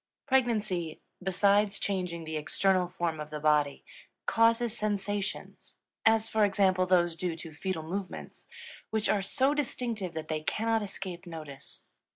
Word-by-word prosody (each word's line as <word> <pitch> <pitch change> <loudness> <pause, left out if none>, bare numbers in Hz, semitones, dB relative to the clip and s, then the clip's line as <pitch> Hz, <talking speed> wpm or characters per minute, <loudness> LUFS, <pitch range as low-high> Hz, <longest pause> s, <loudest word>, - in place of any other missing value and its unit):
Pregnancy, 215 - +1 0.2
besides 200 +2 +3
changing 180 -5 -2
the 160 0 -5
external 180 +4 +2
form 170 -3 -2
of 150 0 -5
the 150 0 -5
body, 150 -2 +2 0.4
causes 230 0 +3
sensations 205 -2 -3 0.3
as 220 0 +4
for 220 -1 +2
example 190 -2 +3
those 175 -2 +3
due 175 0 -2
to 165 -1 -9
fetal 175 +1 -3
movements 185 +3 -6 0.4
which 220 -1 0
are 205 - +2
so 265 +8 +2
distinctive 235 - -2
that 155 -1 -4
they 155 -1 -2
cannot 225 +7 +1
escape 190 -3 -6
notice. 155 -5 -7
190 Hz, 140 wpm, -30 LUFS, 165-215 Hz, 0.4 s, as